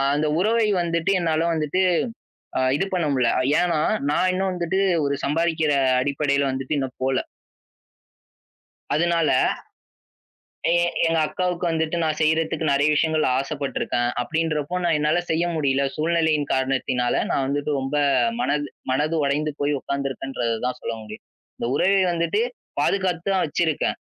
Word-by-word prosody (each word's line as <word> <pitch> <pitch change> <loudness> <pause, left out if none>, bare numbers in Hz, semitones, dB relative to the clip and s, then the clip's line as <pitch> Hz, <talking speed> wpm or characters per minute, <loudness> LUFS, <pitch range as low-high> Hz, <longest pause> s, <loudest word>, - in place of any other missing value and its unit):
அந்த 150 +1 0
உறவை 220 +3 +2
வந்துட்டு, 170 +2 0
என்னால 165 -1 +1
வந்துட்டு 160 +3 0 1.0
இது 195 - 0
பண்ண 175 -3 +1
முடியல. 125 -3 +2 0.3
ஏன்னா 175 -2 +1 0.3
நான் 180 +5 +2
இன்னும் 190 +1 0
வந்துட்டு 180 +1 -1 0.3
ஒரு 140 0 0
சம்பாதிக்கிற 160 +1 +1 0.3
அடிப்படையில 140 +1 0
வந்துட்டு 135 +3 -3
இன்னும் 135 -2 -4
போல. 130 0 +1 1.8
அதுனால, 170 0 +2 1.4
எ - - +4 0.3
எங்க 165 0 +2
அக்காவுக்கு 180 0 -2
வந்துட்டு 160 0 -1
நான் 155 -1 0
செய்றதுக்கு 160 0 +1
நறைய 140 +2 +3
விஷயங்கள் 155 0 +2
ஆசைப்பட்டுருக்கேன். 135 -3 -2
அப்டின்றப்போ 155 +2 -2
நான் 170 -2 +2
என்னால 150 +3 +2
செய்ய 165 +2 +1
முடில. 140 -3 +1
சூழ்நிலையின் 160 -2 +1
காரணத்தினால 130 -2 0 0.2
நான் 135 - +1
வந்துட்டு 145 +2 -1
ரொம்ப 135 +2 -3 0.4
மனது 145 -11 0 0.2
மனது 150 +5 0
உடைந்து 150 +2 0
போய் 145 +1 +1
உக்காந்துருக்கன்றத 135 -4 -3
தான் 125 0 -2
சொல்ல - - -3
முடியும். 110 0 -10 0.3
அந்த - - -3
உறவை 195 +5 +3
வந்துட்டு 170 +5 0 0.4
பாதுகாத்து 185 -3 0
தான் 190 - +2
வச்சிருக்கேன். 160 0 0
155 Hz, 130 wpm, -23 LUFS, 140-170 Hz, 1.8 s, எ